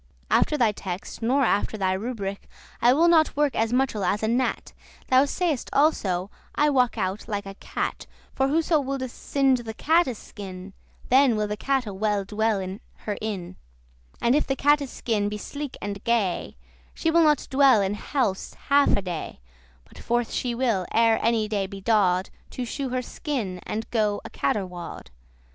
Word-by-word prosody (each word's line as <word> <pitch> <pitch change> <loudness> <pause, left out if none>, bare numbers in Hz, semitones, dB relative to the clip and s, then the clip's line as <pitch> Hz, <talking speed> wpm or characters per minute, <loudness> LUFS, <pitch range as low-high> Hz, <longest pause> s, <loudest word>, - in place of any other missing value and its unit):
After 300 - +3
thy 235 -5 +3
text 190 0 -6
nor 260 +5 +2
after 215 -1 +1
thy 190 -2 +1
rubrich 200 -1 -4 0.4
I 240 - +6
will 320 +6 +4
not 320 -4 +4
work 295 -3 +2
as 225 +1 +1
muchel 250 -5 +1
as 210 +3 0
a - - +2
gnat. 245 +3 -1 0.4
Thou 260 +2 +5
say'st 310 -2 -1
also, 200 - +1 0.2
I 295 0 +3
walk 250 -3 +2
out 190 +3 -2
like 205 -2 -3
a 195 - -7
cat; - - -4 0.3
For 270 - +1
whoso 315 +2 +2
woulde 270 -2 -3
singe 270 -2 +1
the 220 -2 -7
catte's 320 -5 +2
skin 190 -3 -9 0.4
Then 260 -2 +5
will 210 0 0
the 210 - -3
catte 265 +3 0
well 205 0 0
dwell 215 +1 0
in 190 +1 -6 0.2
her 210 - -1
inn;* 200 -5 -4 0.6
*house - - -28
And 235 - +4
if 295 - +2
the 270 - 0
catte's 290 0 +2
skin 210 -5 -1
be 210 - -4
sleek 285 +5 -6
and 200 -1 -5
gay, 215 - 0 0.4
She 325 - 0
will 335 +1 +5
not 300 -3 +3
dwell 270 -4 +6
in 195 +1 -1
house 210 -2 -2
half 285 0 +5
a 200 - -2
day, 175 - -5 0.5
But - - -16
forth 240 0 -1
she 245 -2 -1
will, 230 -7 0
ere 225 -1 +4
any 225 -2 +2
day 205 -2 -1
be 195 0 -8
daw'd, 190 -3 +2 0.2
To 250 - -4
shew 265 +3 -4
her 255 0 -2
skin, 230 -11 -4
and 220 +1 -3
go 210 -3 +1
a - - -8
caterwaw'd. 180 - -3
225 Hz, 180 wpm, -25 LUFS, 200-270 Hz, 0.6 s, I